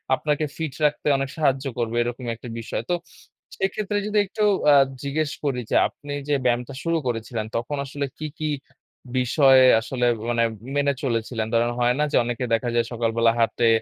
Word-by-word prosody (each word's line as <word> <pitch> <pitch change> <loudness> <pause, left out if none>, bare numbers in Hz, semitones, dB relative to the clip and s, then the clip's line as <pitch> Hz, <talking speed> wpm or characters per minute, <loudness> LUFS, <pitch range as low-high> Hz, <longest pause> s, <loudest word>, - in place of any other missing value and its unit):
আপনাকে 150 +1 -1
ফিট 160 -5 -3
রাখতে 150 0 0
অনেক 135 0 -2
সাহায্য 135 -3 +1
করবে, 115 -1 -1
এরকমই 120 0 -3
একটা 120 +1 -10
বিষয়। 115 - -4
তো - - +2 0.6
সেক্ষেত্রে 205 +2 -1
যদি 210 0 -1
একটু 210 +2 -3 0.3
আ - - +7 0.3
জিজ্ঞেস 145 +1 -1
করি 135 -4 0
যে, - - 0
আপনি 145 0 -11 0.2
যে 145 - +1
ব্যায়ামটা 125 +1 0
শুরু 165 0 +1
করেছিলেন, 115 -1 -3
তখন 130 +5 -3
আসলে 140 +1 -3
কী, 155 - -4
কী 155 - -1 0.7
বিষয় 135 +1 +5 0.2
আসলে 125 0 -2 0.2
মানে 120 -1 +2 0.3
মেনে 140 0 +2
চলেছিলেন? 115 -2 -1
ধরেন, 120 +1 +2
হয় 120 0 +3
না - - +3
যে, - - 0
অনেকে 120 +1 -2
দেখা 120 +1 +1
যায় 120 -1 +2
সকালবেলা 115 0 +2
হাঁটে 115 0 +2
125 Hz, 175 wpm, -24 LUFS, 120-145 Hz, 0.7 s, আ